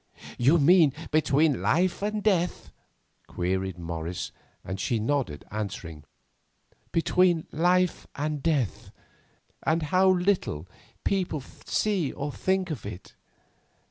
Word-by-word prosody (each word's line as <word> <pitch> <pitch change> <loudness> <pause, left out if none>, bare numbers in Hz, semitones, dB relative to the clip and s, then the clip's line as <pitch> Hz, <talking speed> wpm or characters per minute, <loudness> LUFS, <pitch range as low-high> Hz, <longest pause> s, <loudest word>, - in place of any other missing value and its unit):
"You 135 +8 +5
mean 160 -1 +6 0.2
between 150 -1 +3
life 180 +3 +1
and 210 0 -2
death?" 180 -5 0 0.6
queried 95 +1 -2
Morris, 85 0 -4 0.3
and 95 +1 -4
she 115 +4 0
nodded, 110 - -1
answering: 90 -8 -5 0.9
"Between 175 0 +3
life 180 +2 +2
and 150 0 -2
death, 145 - 0 0.7
and 160 +1 +1
how 185 +5 +3
little 180 - +1 0.4
people 180 -6 0 0.3
see 195 -9 +1
or 145 +1 -4
think 190 +3 0
of 135 -10 -5
it. 100 -2 -8
150 Hz, 110 wpm, -27 LUFS, -, 0.9 s, mean